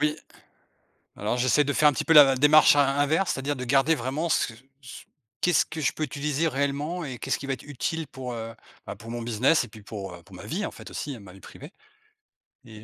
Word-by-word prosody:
Oui, 150 0 +1 1.0
alors 105 +4 -2
j'essaie 130 +4 +3
de 140 - -1
faire 150 +2 +4
un - - +3
petit - - -3
peu 165 - +2
la 145 -4 +8
démarche 150 +2 +6
in 145 - +5
inverse. 155 +6 +1
C'est-à-dire 140 +2 -3
de 125 - -5
garder 135 +5 +3
vraiment 140 +5 -3
ce 140 - +1 0.3
ce 125 -2 -11 0.4
qu'est-ce 180 -4 +3
que 160 - -7
je 145 - +1
peux - - -6
utiliser 150 +2 -1
réellement 145 +5 -2
et 130 -4 -6
qu'est-ce - - -2
qui 140 - -8
va 135 - -1
être 130 - -6
utile 145 +4 -4
pour, 125 -3 -7
heu, 115 0 -6 0.3
bah, - - -6
pour 115 +3 -11
mon 120 0 -5
business 120 +6 +2
et - - -11
puis 110 0 -14
pour, 100 -3 -7
heu, 85 - -13
pour - - -16
ma - - -11
vie, - - -3
en - - -5
fait, - - -12
aussi, 145 - -5
hein, - - -13
ma 95 -2 -13
vie 95 - -16
privée 145 - -12 0.9
et 110 -2 -13
140 Hz, 240 wpm, -26 LUFS, 120-150 Hz, 1.0 s, la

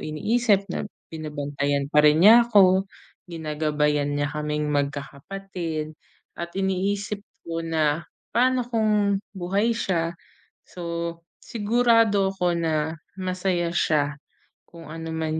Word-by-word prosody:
iniisip 205 +6 +1
na - - -3 0.2
binabantayan 145 -2 -2
pa 150 - +6
rin 150 +2 +5
niya 235 +2 +8
ako, 190 -3 +5 0.4
ginagabayan 150 -2 0
niya 145 - +1
kaming 150 0 -2
magkakapatid 155 +3 -4 0.4
at 170 0 -4
iniisip 195 +2 -1 0.3
ko 165 0 -3
na, 160 -1 0 0.3
"paano 255 +1 +3
kung 210 -4 +2 0.2
buhay 195 +5 0
siya?" 170 -6 -1 0.5
So 170 -1 -5 0.2
sigurado 225 -3 +2
ako 180 -2 +1
na 160 -1 0 0.2
masaya 185 -2 -1
siya 150 -3 +1 0.5
kung 165 -2 -13
ano 165 0 -6
man 160 0 -2
170 Hz, 110 wpm, -24 LUFS, 150-195 Hz, 0.5 s, niya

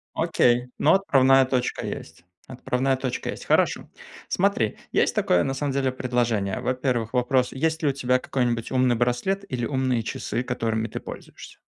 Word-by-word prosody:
Окей, 120 +1 +2
но 155 - +4
отправная 135 -8 +4
точка 130 -1 -2
есть. 80 +2 -8 0.2
Отправная 130 +1 -1
точка 130 -1 -3
есть. - - -9
Хорошо. - - +1 0.4
Смотри, 180 - 0
есть - - +1
такое 90 - +2
на 135 - -1
самом 140 +1 -2
деле 135 -1 0
предложение. 120 -6 -1
Во-первых, 125 -3 -1
вопрос: 125 0 +1
есть 160 +4 -1
ли 150 - +2
у 140 - +2
тебя 130 -2 +1
какой-нибудь 120 -3 -2
умный 130 -2 +2
браслет 125 - 0
или 120 -3 -2
умные 130 -3 0
часы, 120 +2 -3
которыми 115 -3 -2
ты - - -5
пользуешься? - - -11
125 Hz, 160 wpm, -24 LUFS, 120-135 Hz, 0.4 s, но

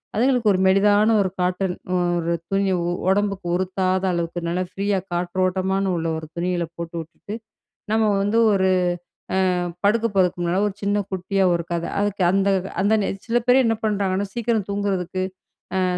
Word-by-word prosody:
அதுங்களுக்கு 240 -2 +3
1 185 - 0
மெலிதான 205 +3 +4
1 185 - -2
காட்டன் 180 0 0 0.4
1 170 0 -1 0.2
துணி, 195 -1 +1 0.4
ஒடம்புக்கு 200 -2 0
உறுத்தாத 185 0 0
அளவுக்கு 170 0 -3
நல்லா 180 +2 0
ஃப்ரீயா 200 0 0
காற்றோட்டமான 185 +2 0
உள்ள 165 0 -2
1 155 - -9
துணிகள 175 0 -1
போட்டு 170 0 -6
விட்டுட்டு, 170 +6 -9 0.6
நம்ம 220 0 +3
வந்து 205 +3 +1 0.2
1 190 -1 +2 0.9
அ - - 0 0.3
படுக்கப் 225 +1 +2
போறதுக்கு 180 -2 +2
முன்னால 175 +3 +1
1 195 - -7
சின்ன 205 +1 +1
குட்டியா 190 +1 -1
1 170 - -1
கத. 170 0 -1
அதுக்கு 205 -1 0
அந்த 195 +1 +2 0.3
அந்த 205 +3 +3
நேர 195 - -1
சில 240 +1 +2
பேர் 250 +1 +6
என்ன 225 - +2
பண்றாங்கன்னா, 200 -2 0
சீக்கிரம் 230 -3 0
தூங்குறதுக்கு, 190 -2 -1 0.6
அ - - +2
195 Hz, 155 wpm, -22 LUFS, 180-205 Hz, 0.9 s, பேர்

